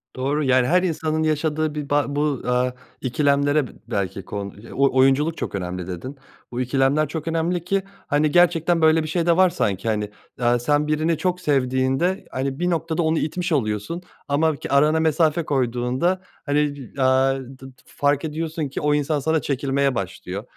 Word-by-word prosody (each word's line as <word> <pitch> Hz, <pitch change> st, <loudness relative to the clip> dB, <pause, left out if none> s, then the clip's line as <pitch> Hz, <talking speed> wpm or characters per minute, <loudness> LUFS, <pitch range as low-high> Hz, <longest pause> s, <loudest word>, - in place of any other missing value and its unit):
Doğru, 140 Hz, +4 st, -1 dB
yani, 130 Hz, -2 st, +3 dB
her 180 Hz, +5 st, +3 dB
insanın 160 Hz, -2 st, -1 dB
yaşadığı 155 Hz, 0 st, 0 dB
bi 150 Hz, -2 st, -5 dB
ba 145 Hz, 0 st, +2 dB
bu 145 Hz, -3 st, 0 dB
aaa, 125 Hz, 0 st, +1 dB, 0.3 s
ikilemlere 140 Hz, +2 st, +2 dB
b -, -, -13 dB, 0.2 s
belki 100 Hz, -4 st, -3 dB
kon 100 Hz, 0 st, -6 dB, 0.2 s
o 135 Hz, 0 st, +2 dB
oyunculuk 135 Hz, +5 st, +3 dB
çok -, -, -4 dB
önemli 90 Hz, -1 st, -4 dB
dedin. 95 Hz, +10 st, -6 dB, 0.3 s
Bu 125 Hz, +1 st, -2 dB
ikilemler 135 Hz, +4 st, +2 dB
çok 160 Hz, +2 st, -5 dB
önemli 165 Hz, +1 st, 0 dB
ki, 195 Hz, +2 st, 0 dB, 0.2 s
hani, 150 Hz, +1 st, +2 dB
gerçekten, 175 Hz, -1 st, +3 dB
böyle, 160 Hz, 0 st, +4 dB
bir -, -, -4 dB
şey 165 Hz, +1 st, -1 dB
de 170 Hz, 0 st, +3 dB
var 185 Hz, 0 st, +6 dB
sanki, 100 Hz, -, -2 dB
hani, 105 Hz, -2 st, 0 dB, 0.3 s
aaa, 120 Hz, 0 st, +2 dB
sen 145 Hz, +4 st, +1 dB
birini 155 Hz, +2 st, +1 dB
çok 180 Hz, +1 st, -1 dB
sevdiğinde, 135 Hz, +4 st, +1 dB
hani, 135 Hz, +1 st, -3 dB
bir 175 Hz, 0 st, +1 dB
noktada 165 Hz, -1 st, -1 dB
onu 160 Hz, 0 st, +1 dB
itmiş 175 Hz, +3 st, -2 dB
oluyorsun 110 Hz, -, -1 dB, 0.3 s
ama 155 Hz, +2 st, +2 dB
ki -, -, -7 dB
arana 150 Hz, +3 st, +4 dB
mesafe 160 Hz, 0 st, +2 dB
koyduğunda, 130 Hz, +6 st, 0 dB, 0.2 s
hani, 145 Hz, 0 st, +1 dB, 0.2 s
d 135 Hz, -, -3 dB
aaa 130 Hz, +1 st, +3 dB
d 130 Hz, 0 st, -11 dB, 0.2 s
f -, -, -20 dB
fark 145 Hz, +1 st, +1 dB
ediyorsun 160 Hz, 0 st, -3 dB
ki -, -, -5 dB
o 150 Hz, 0 st, +2 dB
insan 150 Hz, +1 st, +1 dB
sana 160 Hz, +2 st, +1 dB
çekilmeye 140 Hz, -1 st, 0 dB
başlıyor. 95 Hz, 0 st, -5 dB
145 Hz, 180 wpm, -22 LUFS, 130-160 Hz, 0.3 s, var